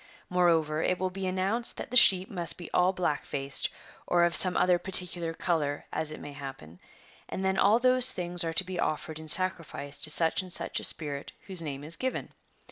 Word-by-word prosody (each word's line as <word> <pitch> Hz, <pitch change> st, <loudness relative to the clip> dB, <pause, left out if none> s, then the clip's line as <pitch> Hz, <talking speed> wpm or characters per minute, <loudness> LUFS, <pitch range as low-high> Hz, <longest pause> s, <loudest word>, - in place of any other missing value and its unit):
* -, -, -27 dB
Moreover 165 Hz, -4 st, +1 dB
it 185 Hz, -, 0 dB
will 185 Hz, 0 st, -3 dB
be 190 Hz, 0 st, -5 dB
announced 195 Hz, +6 st, -1 dB
that -, -, -8 dB
the -, -, -5 dB
sheep 190 Hz, -6 st, +7 dB
must 175 Hz, -4 st, -1 dB
be 175 Hz, -, -10 dB
all 180 Hz, +1 st, +2 dB
black 180 Hz, -6 st, -2 dB
faced, 135 Hz, -1 st, -2 dB, 0.4 s
or 175 Hz, -1 st, +2 dB
of 170 Hz, -1 st, +1 dB
some 185 Hz, -1 st, +6 dB
other 180 Hz, -1 st, +2 dB
particular 180 Hz, -3 st, 0 dB
colour 155 Hz, -4 st, -2 dB
as 160 Hz, -1 st, -2 dB
it 155 Hz, -, -7 dB
may 145 Hz, -, -10 dB
happen; 135 Hz, -, -10 dB, 0.5 s
and 190 Hz, -, -4 dB
then 190 Hz, 0 st, 0 dB
all 210 Hz, +3 st, +4 dB
those 255 Hz, +1 st, +5 dB
things 175 Hz, -3 st, -1 dB
are 165 Hz, -1 st, -3 dB
to 180 Hz, -, +1 dB
be 185 Hz, -1 st, -7 dB
offered 155 Hz, 0 st, -3 dB
in 160 Hz, -, -11 dB
sacrifice 165 Hz, -5 st, -1 dB
to 155 Hz, -, +2 dB
such 165 Hz, +4 st, +3 dB
and 185 Hz, -1 st, -6 dB
such -, -, -1 dB
a -, -, -8 dB
spirit 145 Hz, -3 st, -1 dB
whose 190 Hz, -4 st, -1 dB
name 145 Hz, -3 st, -6 dB
is 160 Hz, +3 st, 0 dB
given.'' 260 Hz, 0 st, -4 dB
175 Hz, 210 wpm, -28 LUFS, 155-185 Hz, 0.5 s, sheep